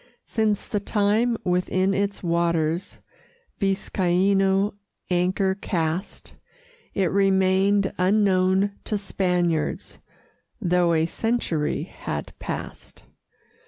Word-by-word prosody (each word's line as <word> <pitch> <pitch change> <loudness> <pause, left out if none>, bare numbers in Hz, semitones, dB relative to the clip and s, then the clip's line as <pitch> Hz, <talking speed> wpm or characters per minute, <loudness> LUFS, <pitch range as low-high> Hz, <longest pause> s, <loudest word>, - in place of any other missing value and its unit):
Since 215 -3 0
the 210 - -1
time 215 +3 +1
within 185 +2 +1
its 200 0 -2
waters 170 0 0 0.6
Viscaino 195 0 +1 0.4
anchor 185 +2 +1
cast, 175 -1 -3 0.6
It 190 -4 +1
remained 195 0 +3
unknown 190 0 +2
to 210 - -1
Spaniards, 180 -5 -1 0.6
Though 180 -4 +2
a 160 0 +2
century 175 -6 -1
had - - -6
passed. - - -7
190 Hz, 85 wpm, -24 LUFS, 180-200 Hz, 0.6 s, remained